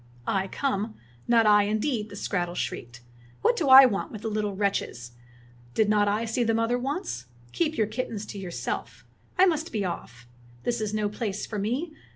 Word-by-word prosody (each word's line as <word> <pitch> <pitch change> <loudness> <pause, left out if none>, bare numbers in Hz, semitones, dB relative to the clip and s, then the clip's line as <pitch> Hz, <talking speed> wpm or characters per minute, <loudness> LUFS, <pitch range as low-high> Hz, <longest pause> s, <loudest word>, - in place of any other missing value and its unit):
'' - - -27
"I 195 0 +1
come? 215 -2 -2 0.3
Not 230 -1 +5
I, 210 -1 +6
indeed!" 215 +1 -1
the 200 - -9
skrattel 175 -3 -2
shrieked. 120 -6 -5 0.4
"What 485 - +4
do 310 - 0
I 265 +1 +11
want 205 -6 -1
with 215 -2 -8
the 225 - -1
little 210 -2 -2
wretches 190 - -2 0.6
Did 215 -1 +3
not 210 -1 +3
I 210 +3 +1
see 230 +2 0
the 225 -1 +1
mother 230 +2 +1
once.^ 260 - -3 0.3
Keep 315 -2 0
your 220 - +3
kittens 215 -1 -4
to 205 - -7
yourself. 180 -3 -5 0.3
I 370 - +7
must 325 -3 0
be 205 -3 -1
off. 120 -9 -6 0.4
This 240 -2 -1
is 215 -1 -1
no 215 -1 0
place 210 -1 -3
for 210 - -4
me. 260 - -2
215 Hz, 190 wpm, -27 LUFS, 200-245 Hz, 0.6 s, I